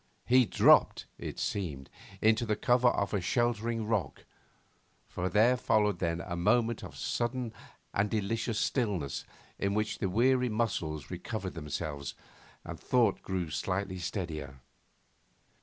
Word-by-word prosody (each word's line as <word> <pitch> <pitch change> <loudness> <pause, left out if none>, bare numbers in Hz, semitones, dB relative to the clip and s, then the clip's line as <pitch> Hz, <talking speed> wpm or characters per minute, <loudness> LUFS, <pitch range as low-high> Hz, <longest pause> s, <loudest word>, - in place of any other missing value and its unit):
He 125 0 +5
dropped, - - +5
it - - -6
seemed, 75 -9 -3 0.4
into 110 +1 +4
the 110 -2 0
cover 125 +3 +3
of 100 -4 +1
a 100 - +1
sheltering 115 +2 0
rock, 105 -10 -2 0.8
for 90 +1 -3
there 115 +5 +4
followed 105 -5 +2
then 85 -1 -1
a 85 - -5
moment 115 +6 +2
of - - -9
sudden 120 -1 -2 0.4
and 100 +1 +1
delicious 110 +2 -1
stillness 100 - -1 0.3
in 100 +1 0
which 105 0 -1
the 95 - 0
weary 125 +5 +3
muscles 85 - -2
recovered 95 +2 -4
themselves 75 -2 -5 0.5
and - - -7
thought 115 -5 +2
grew 90 -4 -3
slightly 95 +4 -2
steadier. 80 - -5
105 Hz, 130 wpm, -31 LUFS, 85-115 Hz, 0.8 s, He